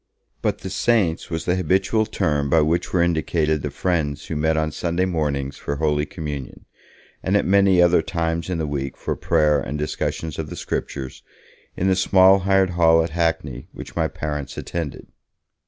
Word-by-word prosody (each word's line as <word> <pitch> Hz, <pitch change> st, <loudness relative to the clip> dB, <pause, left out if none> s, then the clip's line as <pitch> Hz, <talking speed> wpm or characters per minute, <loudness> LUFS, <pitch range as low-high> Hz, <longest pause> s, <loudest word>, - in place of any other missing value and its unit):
But -, -, 0 dB
'the 95 Hz, -, -6 dB
saints' 100 Hz, -7 st, +1 dB
was 80 Hz, -1 st, -3 dB
the 90 Hz, -, +1 dB
habitual 95 Hz, +5 st, +1 dB
term 75 Hz, -10 st, 0 dB
by 80 Hz, +3 st, +4 dB
which 80 Hz, +3 st, 0 dB
were 90 Hz, -2 st, +3 dB
indicated 80 Hz, -2 st, 0 dB
the 75 Hz, -, -3 dB
friends 75 Hz, -1 st, -1 dB
who 80 Hz, -, -4 dB
met 80 Hz, +1 st, +1 dB
on 80 Hz, 0 st, 0 dB
Sunday 85 Hz, +3 st, -1 dB
mornings 70 Hz, -6 st, -2 dB
for 70 Hz, -, -4 dB
Holy 75 Hz, 0 st, 0 dB
Communion, 75 Hz, -8 st, -7 dB, 0.6 s
and 95 Hz, +2 st, +2 dB
at -, -, 0 dB
many 95 Hz, -2 st, +5 dB
other 85 Hz, -1 st, +4 dB
times 85 Hz, +1 st, -2 dB
in 90 Hz, -, -1 dB
the 80 Hz, -, -1 dB
week 70 Hz, -2 st, -4 dB
for -, -, -3 dB
prayer 75 Hz, -3 st, +2 dB
and 70 Hz, +3 st, -4 dB
discussion 75 Hz, +1 st, -3 dB
of 75 Hz, -2 st, -4 dB
the -, -, -6 dB
Scriptures, 65 Hz, -2 st, -5 dB, 0.6 s
in 95 Hz, -, 0 dB
the 95 Hz, -, +3 dB
small 95 Hz, +1 st, +5 dB
hired 95 Hz, -1 st, +2 dB
hall 80 Hz, -1 st, +4 dB
at 80 Hz, -, -4 dB
Hackney, 80 Hz, -5 st, -1 dB
which -, -, -10 dB
my -, -, +1 dB
parents 75 Hz, -3 st, -5 dB
attended. 85 Hz, -5 st, -5 dB
80 Hz, 180 wpm, -22 LUFS, 75-90 Hz, 0.6 s, many